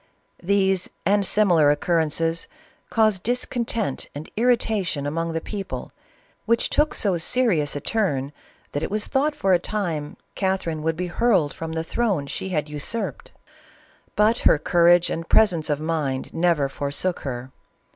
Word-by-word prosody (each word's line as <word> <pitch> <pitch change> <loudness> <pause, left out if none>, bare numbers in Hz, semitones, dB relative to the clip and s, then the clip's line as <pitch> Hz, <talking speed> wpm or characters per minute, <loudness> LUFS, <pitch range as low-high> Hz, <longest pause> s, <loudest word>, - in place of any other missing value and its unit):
These 190 0 +1 0.2
and 205 +1 +3
similar 180 -7 +4
oc 145 - +2
currences 165 0 +1 0.4
caused 215 -4 +2
discontent 235 - -2
and 145 +2 -8
irritation 220 - +1
among 165 +3 -2
the 165 - -1
people, 195 +3 -6 0.6
which 230 +1 +2
took 300 +1 +2
so 195 -4 +1
serious 170 -6 +2
a 145 - -3
turn, 145 - -1 0.4
that 145 - -2
it - - -2
was 210 +1 -1
thought 290 +2 0
for 195 -9 +2
a 175 - +4
time 170 -7 -3 0.2
Catherine 190 -5 -1
would 160 +1 0
be 180 +3 -3
hurled 180 - +1
from 160 0 -6
the 160 0 -2
throve 170 -8 -1
she 190 - -4
had 155 -5 -1
usurped 150 - -4
j, - - -33 0.7
but 215 +3 +3
her - - +5
courage 175 +2 +4
and 165 0 -4
presence 180 -8 +3
of 145 -1 0
mind 155 -5 -2
never 165 -4 +2
forsook 145 +6 -3
her. 130 -1 -6
175 Hz, 155 wpm, -23 LUFS, 150-210 Hz, 0.7 s, her